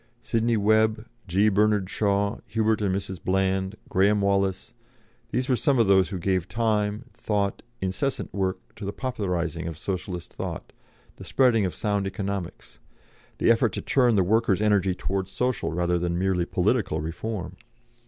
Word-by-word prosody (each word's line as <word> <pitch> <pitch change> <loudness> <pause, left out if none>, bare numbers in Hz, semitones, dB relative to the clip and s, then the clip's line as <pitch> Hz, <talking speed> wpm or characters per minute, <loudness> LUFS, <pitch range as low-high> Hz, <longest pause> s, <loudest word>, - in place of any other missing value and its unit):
Sidney 115 0 0
Webb, 110 +1 +2 0.2
G. 95 +4 +3
Bernard 105 -1 +2
Shaw, 100 +1 0
Hubert 110 -1 +1
and 95 -2 +1
Mrs. 95 -3 -5
Bland, 95 +1 0
Graham 100 +2 +3
Wallas 100 -1 0 0.6
these 125 +1 -1
were 130 - +3
some 140 +2 +2
of 115 - +4
those 95 -1 +4
who 95 - -4
gave 95 0 0
time, 105 +2 0
thought, 100 -2 -1 0.2
incessant 95 +9 -2
work 95 -2 -3
to 105 - -8
the 100 +1 -3
popularising 90 - -2
of 80 -2 -5
Socialist 90 -1 -5
thought, - - -6 0.4
the - - -10
spreading 120 -6 +3
of 90 - -3
sound 100 -2 -1
economics, 100 -3 -5 0.6
the - - +4
effort 115 -3 +2
to - - -3
turn 125 -4 +3
the 95 - +4
workers' 110 0 +2
energy 100 -3 +2
toward 95 0 -2
social 125 +4 -1
rather 85 +1 0
than 85 0 -1
merely 90 -1 +1
political 95 -3 0
reform. 90 +5 -4
100 Hz, 155 wpm, -26 LUFS, 95-110 Hz, 0.6 s, of